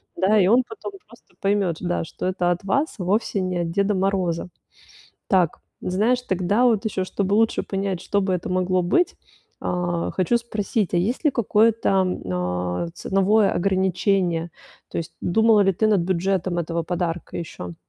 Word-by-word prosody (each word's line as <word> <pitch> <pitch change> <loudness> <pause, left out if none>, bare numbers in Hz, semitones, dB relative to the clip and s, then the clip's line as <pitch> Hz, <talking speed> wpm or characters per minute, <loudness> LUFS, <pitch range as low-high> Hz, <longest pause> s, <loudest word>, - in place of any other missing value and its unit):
Да, 210 +3 +3
и 185 - +4
он 240 +5 +5
потом 415 -1 -8
просто - - -20
поймёт, 195 -4 +1
да, 175 -1 -1
что - - -7
это 180 -1 +1
от 175 +1 -2
вас, 275 +11 0
вовсе 200 +2 0
не 185 -1 -2
от 165 - -2
Деда 200 +3 +1
Мороза. 185 -3 0 0.8
Так, 180 -5 +2 0.2
знаешь, 215 +7 +1
тогда 195 +2 +1
вот 225 -3 +2
ещё, 190 -3 -1
чтобы 195 +1 -1
лучше 225 +1 +2
понять, 195 -2 -3
что 200 - 0
бы 190 -1 0
это 180 - -4
могло 185 0 +1
быть. 345 - +2 0.5
Э, 175 -1 -1
хочу 190 +6 +1
спросить: 215 -4 -2
а - - +3
есть 235 - -1
ли 300 - +5
какое-то, 225 -1 +2 1.0
э, - - -8
ценовое 195 +3 +2
ограничение? 185 -2 +1 0.4
То - - -3
есть 165 - -6
думала 220 +3 +4
ли 195 - +3
ты 215 +5 +1
над 210 -3 +3
бюджетом 185 0 0
этого 170 0 -2
подарка 175 0 -3
ещё? 90 - -6
190 Hz, 165 wpm, -23 LUFS, 175-210 Hz, 1.0 s, он